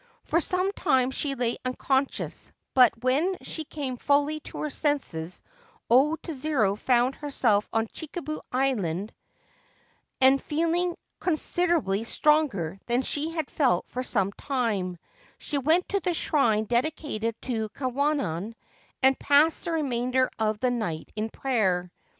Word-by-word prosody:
For 335 - +1
some 365 +3 +1
time 265 -10 +2
she 275 +1 -2
lay 240 -2 -1
unconscious; 265 +1 -1 0.2
bu 255 -2 +8 0.2
when 300 +9 +2
she 315 - -4
came 275 -4 -4
fully 290 +3 +2
to - - -7
her 305 - -1
senses 185 - -1 0.5
O 285 +6 +5
Tsuru 275 - 0
found 245 +3 +2
hersel 250 -8 +1
on 225 0 +1
Chikubu 310 - -6
Island, 215 -8 0 1.1
and, 265 +1 +5
feeling 335 +3 0 0.2
considerably 330 - +1
stronge 230 - +1
than 245 +2 +1
she 300 +4 -1
had 320 -3 -4
felt 250 - +2
for 250 - -2
some 200 -6 0
time, 210 -8 -2 0.4
she 290 - -2
went 320 +6 +2
to 400 - +1
the 355 -2 -1
shrin 225 -10 +2
dedicated 240 -2 -1
to 225 -4 -2
Kwannon, 255 - -1 0.5
and 265 0 +5
passed 290 +3 +3
the 340 - -2
remainder 255 -4 +1
of 215 -1 0
th 250 -1 +2
night 175 -10 -3
in 215 +1 -2
prayer. 190 -10 0
260 Hz, 130 wpm, -27 LUFS, 225-305 Hz, 1.1 s, bu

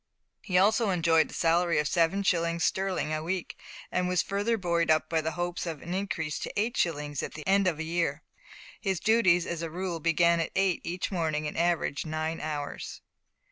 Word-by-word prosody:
He 180 - 0
also 215 +3 +4
enjoyed 165 -3 +3
a - - -11
salary 170 +1 +2
of 150 0 +2
seven 170 +5 +2
shillings 170 -3 +1
sterling 190 -5 0
a 155 - -1
week, 175 +2 -3 0.4
and 180 - 0
was 180 -1 +2
further 205 +4 0
buoyed 170 -4 0
up 155 0 +2
with 160 -1 +1
the 160 - -1
hope 175 +1 -3
of 160 -4 -5
an 175 - -5
increase 185 -6 -2
to - - -5
eight 225 +3 0
shillings 150 -4 -1
at - - -6
the 155 - -8
end 195 0 +3
of 170 -4 +1
a 160 - -3
year. 165 -2 -1 0.6
His 190 -5 -1
duties, 190 -6 +4
as 170 -1 -4
a 165 - -3
rule, 175 0 -3
began 170 +1 +3
at 165 - -2
eight 195 -2 +2
each 180 +4 -3
morning, 155 -4 -1
and - - -6
averaged 170 -3 0
nine 155 +1 -2
hours. 145 -2 -5
170 Hz, 200 wpm, -28 LUFS, 160-185 Hz, 0.6 s, also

